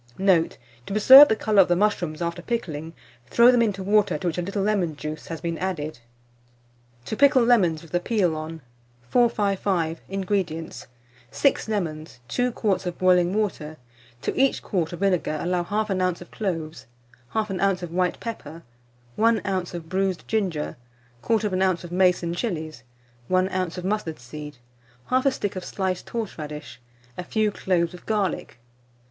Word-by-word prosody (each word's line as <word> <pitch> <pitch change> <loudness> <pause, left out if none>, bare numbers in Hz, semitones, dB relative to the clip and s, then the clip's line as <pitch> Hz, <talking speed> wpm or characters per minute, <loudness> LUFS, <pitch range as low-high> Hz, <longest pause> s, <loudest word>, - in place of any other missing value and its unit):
Note. 190 -4 +2 0.3
To - - -4
preserve 260 +7 +10
the 220 - +2
colour 215 -2 +4
of 185 - +3
the 175 - +3
mushrooms 175 -5 0
after 170 +1 -3
pickling, 165 -8 -4 0.3
throw 235 - +6
them 245 -1 +3
into 200 -4 0
water 210 +2 +2
to 190 - -8
which 175 0 -1
a - - 0
little 195 +2 -2
lemon 195 -7 0
juice 155 +1 -6
has 165 -2 -6
been 170 -1 -3
added. 160 -7 -3 1.1
TO 220 - -3
PICKLE 280 0 +5
LEMONS 185 -10 +3
WITH 165 - -15
THE 175 - +1
PEEL 180 -4 +1
ON. 155 +1 -6 0.5
455. 200 -8 +1
INGREDIENTS. 185 -4 -3 0.4
6 275 - +1
lemons, 160 - -4
2 245 - 0
quarts 200 -5 -1
of 175 - -4
boiling 180 0 +3
water; 165 -8 -2 0.5
to - - -2
each 270 0 +2
quart 175 -6 -1
of 175 - -8
vinegar 180 -5 +1
allow 175 +1 0
1/2 205 -1 -1
oz. - - -15
of 175 - -13
cloves, 165 - -4 0.5
1/2 210 -4 -1
oz. 195 -2 +1
of 170 - -5
white 180 0 0
pepper, 165 -8 -7 0.5
1 225 0 +3
oz. 185 -3 -2
of 165 -2 -7
bruised 190 0 -1
ginger, 185 - -1 0.5
1/4 215 -3 +1 0.2
oz. 170 - -14
of 175 - -9
mace 180 0 +3
and 170 0 -2
chilies, 160 - -4 0.5
1 185 0 +2
oz. 185 -2 -2
of 180 - -5
mustard 190 -6 -2
seed, 150 +3 -9 0.5
1/2 260 +2 +3
stick 205 -6 -3
of 185 - -5
sliced 190 -2 -3
horseradish, 150 - -6 0.4
a - - -3
few 215 +3 0
cloves 175 -4 0
of 180 - -11
garlic. 205 - -1
185 Hz, 165 wpm, -24 LUFS, 165-210 Hz, 1.1 s, preserve